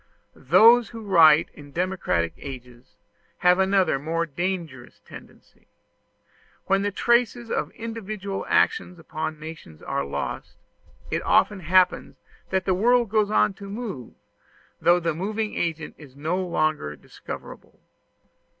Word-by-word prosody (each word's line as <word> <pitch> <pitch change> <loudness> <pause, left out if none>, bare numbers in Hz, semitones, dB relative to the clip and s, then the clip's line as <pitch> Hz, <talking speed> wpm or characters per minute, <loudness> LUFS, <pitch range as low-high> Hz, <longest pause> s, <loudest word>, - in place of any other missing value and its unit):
Those 230 0 +5
who 225 -1 -9
write 165 -6 +5
in 145 -1 -14
democratic 170 - -1
ages 125 -1 -11 0.4
have 180 +1 +4
another 190 -6 +2
more 165 +3 -1
dangerous 165 -5 -5
tendency. - - -15 1.0
When 195 0 +2
the 205 - 0
traces 235 +2 +1
of - - -1
individual 215 -3 -5
action 180 - +1
upon 155 -1 -5
nations 155 - -11
are 70 - -2
lost, 70 - -5 0.5
it - - -1
often 205 - +2
happens 180 +1 +2 0.3
that 190 0 -1
the 190 - +2
world 235 +4 +3
goes 215 -2 +2
on 210 - +2
to 200 +1 -11
move, 200 - -7 0.7
though 175 +1 +4
the 165 -2 -1
moving 210 +6 -3
agent 160 -3 -3
is 140 -4 -14
no 165 +6 -2
longer 155 - -1
discoverable. - - -11
180 Hz, 125 wpm, -24 LUFS, 155-205 Hz, 1.0 s, Those